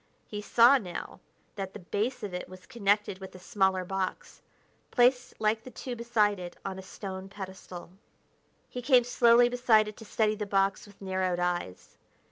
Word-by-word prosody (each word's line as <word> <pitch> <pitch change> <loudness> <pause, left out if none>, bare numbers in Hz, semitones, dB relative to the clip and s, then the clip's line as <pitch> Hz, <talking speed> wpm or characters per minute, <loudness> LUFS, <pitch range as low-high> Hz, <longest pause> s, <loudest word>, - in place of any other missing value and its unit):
He 210 -1 -6
saw 240 +5 +6
now 180 -5 -7 0.4
that 195 -1 -5
the - - -8
base 210 +8 -2
of 200 -3 -5
it 180 - -5
was 185 0 -12
connected 205 -4 0
with 190 -1 -10
a - - -8
smaller 190 0 0
box, 190 0 -4 0.5
placed 245 0 +2
like 220 +1 +1
the 255 - -9
two 250 0 -6
beside 220 -4 +1
it 175 -1 -8
on 190 -1 -4
a - - -6
stone 190 0 -7
pedestal. 190 -3 -9 0.8
He 250 - -6
came 250 -1 +5
slowly 240 0 +5
beside 245 -3 +3
it 210 - -8
to 225 - -11
study 215 0 +1
the 210 -1 -4
box 195 0 +1
with 205 - -18
narrowed 185 -2 -1
eyes. 175 - -3
205 Hz, 175 wpm, -29 LUFS, 190-235 Hz, 0.8 s, saw